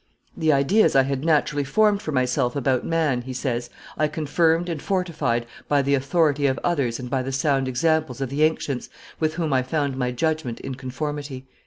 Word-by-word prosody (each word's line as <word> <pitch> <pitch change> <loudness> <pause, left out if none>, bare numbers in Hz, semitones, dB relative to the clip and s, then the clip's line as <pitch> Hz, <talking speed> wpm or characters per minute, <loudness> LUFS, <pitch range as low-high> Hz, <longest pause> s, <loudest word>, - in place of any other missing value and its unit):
"The 160 -1 +2
ideas 150 +10 +3
I 135 - +6
had 135 0 -2
naturally 150 -2 +2
formed 210 +7 +2
for 155 - -4
myself 125 -1 +1
about 130 -2 +1
man," 155 -7 +1
he 130 +1 -7
says, 125 -2 -2 0.3
"I 155 - +1
confirmed 160 +3 +1
and 165 -4 -3
fortified 155 -11 -1 0.2
by 145 -1 +2
the 140 +1 +1
authority 145 +1 +2
of 130 0 0
others 140 -9 0
and 125 - -6
by 130 +1 0
the 130 +1 -4
sound 135 -1 +1
examples 155 0 0
of 135 -2 -2
the 145 +2 -1
ancients, 150 -4 0 0.3
with 155 0 0
whom 160 -4 -1
I 130 - +3
found 140 +1 -1
my 125 -1 0
judgment 155 -1 -1
in 135 - -5
conformity." 135 +1 -5
140 Hz, 190 wpm, -23 LUFS, 130-160 Hz, 0.3 s, I